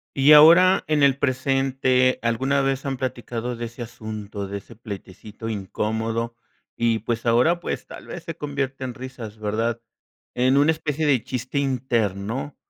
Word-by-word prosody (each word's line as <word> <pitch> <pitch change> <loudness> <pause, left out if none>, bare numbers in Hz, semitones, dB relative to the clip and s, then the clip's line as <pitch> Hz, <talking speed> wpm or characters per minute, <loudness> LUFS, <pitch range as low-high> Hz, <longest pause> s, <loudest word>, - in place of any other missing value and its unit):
Y 140 +2 +6
ahora 170 +5 +8
en 155 -1 +2
el 140 -1 +4
presente, 130 -1 +1
¿alguna 130 +4 +1
vez 135 0 -1
han 135 -2 -2
platicado 120 -1 -4
de 120 - -5
ese 115 +1 -9
asunto, 110 -3 -6
de 100 +1 -5
ese 115 - -16
pleitecito 105 0 -8
incómodo? 110 +3 -2 0.4
Y, 115 -1 +1
pues 115 +2 -3
ahora, 125 +9 +3
pues, - - -5
tal - - -11
vez 175 - -8
se 165 -1 -7
convierte 140 -2 -3
en 125 -2 -4
risas, 120 -4 -9
¿verdad? 115 +2 -1 0.5
En 130 +2 +3
una 145 +2 +4
especie 155 -1 -2
de 130 -6 +3
chiste 125 +2 -4
interno, 125 -2 -1
125 Hz, 155 wpm, -23 LUFS, 115-135 Hz, 0.5 s, ahora